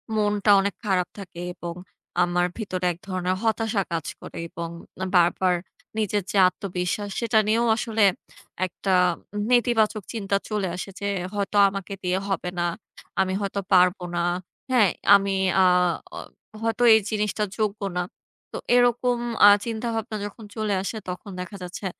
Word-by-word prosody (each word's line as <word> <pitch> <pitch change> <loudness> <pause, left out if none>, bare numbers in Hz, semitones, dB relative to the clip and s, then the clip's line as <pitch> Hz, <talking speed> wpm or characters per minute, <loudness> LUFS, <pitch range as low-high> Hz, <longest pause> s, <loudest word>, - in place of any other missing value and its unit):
মনটা 210 -1 +2
অনেক 200 0 0
খারাপ 185 -3 +1
থাকে 180 -4 -9
এবং 170 -1 -6 0.5
আমার 175 0 +1
ভেতরে 185 -5 -3
এক 170 - -8
ধরনের 185 -1 -1
হতাশা 225 -2 +1
কাজ 165 -3 -2 0.2
করে - - -9
এবং 170 0 -5 0.5
বারবার 180 +1 +4 0.4
নিজের 210 -2 0
যে 205 - 0
আত্মবিশ্বাস 185 +2 -3
সেটা 230 -2 +3
নিয়েও 230 +2 +2
আসলে 225 -3 0 0.6
একটা 185 +2 -2 0.6
নেতিবাচক 230 -4 +2
চিন্তা 200 -3 -1
চলে 210 -3 -1
আসে 185 - -6
যে, 200 - -4 0.3
হয়তো 205 0 -1
আমাকে 195 0 -6
দিয়ে 180 0 +1
হবেনা, 180 -3 -2 0.6
আমি 190 0 0
হয়তো 200 0 -2
পারব 180 +1 +5 0.2
না। - - 0 0.5
হ্যাঁ? 230 -6 +5 0.3
আমি 195 0 +2 0.3
আ - - +6 0.5
অ - - -7 0.4
হয়তো 230 +1 0
এই 220 - +7
জিনিসটা 210 0 -1
যোগ্য 210 -1 -1 0.2
না। 180 - +1 0.5
তো - - -5 0.2
এরকম 245 0 +3 0.3
-আ - - +11 0.2
চিন্তাভাবনা 225 0 -3
যখন 205 +2 -9
চলে 215 -2 -1
আসে 210 +3 -4
তখন 180 +3 -6
দেখা 185 +3 -7
যাচ্ছে 180 +3 -7
200 Hz, 145 wpm, -24 LUFS, 185-220 Hz, 0.6 s, আ